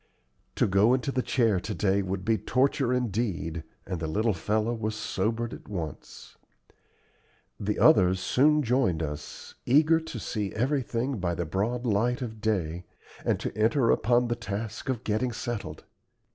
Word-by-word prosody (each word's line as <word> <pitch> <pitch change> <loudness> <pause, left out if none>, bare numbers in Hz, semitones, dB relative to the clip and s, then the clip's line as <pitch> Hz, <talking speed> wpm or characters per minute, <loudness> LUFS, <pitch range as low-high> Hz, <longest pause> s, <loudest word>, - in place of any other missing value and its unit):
To - - +3
go 100 +6 +4
into 130 +2 -2
the 130 - 0
chair 115 -7 +2
to 105 +2 -5
day 100 +2 +2
would 95 0 -4
be 115 0 +3
torture 130 +4 +1
indeed, 100 -9 -1 0.2
and 90 -3 -4
the 80 - -3
little 110 +7 +1
fellow 105 +7 0
was 110 -1 -3
sobered 110 +2 -2
at - - -11
once. 85 -8 -7 1.2
The 105 +1 -1
others 95 -2 +5
soon 140 +11 +3
joined 115 - +1
us, 75 -1 -7
eager 155 +5 +4
to 160 - -7
see 105 -4 -3
everything 125 0 -1
by 85 -1 -1
the 90 - -2
broad 110 +9 -1
light 120 +4 +1
of 110 -3 -7
day, 90 -6 -1 0.4
and - - +1
to - - -4
enter 115 +3 +3
upon 120 +2 +3
the 120 - 0
task 110 +1 -5
of 125 -2 -2
getting 110 +4 0
settled. 120 -1 -5
110 Hz, 160 wpm, -27 LUFS, 95-125 Hz, 1.2 s, others